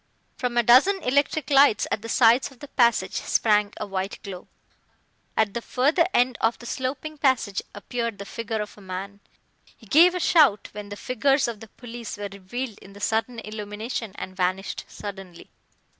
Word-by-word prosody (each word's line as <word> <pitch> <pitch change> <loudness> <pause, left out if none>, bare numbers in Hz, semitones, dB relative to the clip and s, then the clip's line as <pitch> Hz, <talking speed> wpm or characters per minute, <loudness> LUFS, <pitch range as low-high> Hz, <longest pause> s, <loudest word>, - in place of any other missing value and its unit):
From 245 -1 -2
a 240 - +5
dozen 270 - +6
electric 285 +3 +1
lights 275 -6 +5
at 215 - -1
the 230 - -8
sides 235 +1 +4
of 265 - -18
the 290 +3 -11
passage 235 -6 +2
sprang 210 -2 +2
a - - -4
white 195 0 -3
glow. 185 -3 -8 0.9
At 210 -2 +2
the 235 - -3
further 295 +9 +2
end 250 -4 +2
of 225 +1 +2
the 240 - -13
sloping 285 +5 -4
passage 255 -8 +1
appeared 230 +1 -3
the 200 - -7
figure 225 0 -3
of 210 - -12
a 210 - -15
man. 195 +2 -6 0.6
He - - -18
gave 335 - +6
a - - -1
shout 295 - +4
when 205 -1 -8
the 205 - -6
figures 270 +4 +1
of 230 -3 -5
the 225 - -11
police 235 -1 -8
were 205 -1 -5
revealed 205 +4 -6
in 195 - -14
the 205 - -12
sudden 225 +4 -1
illumination 215 +1 -5
and 185 - -7
vanished 185 +1 -2
suddenly. 195 -4 -9
225 Hz, 180 wpm, -25 LUFS, 205-255 Hz, 0.9 s, dozen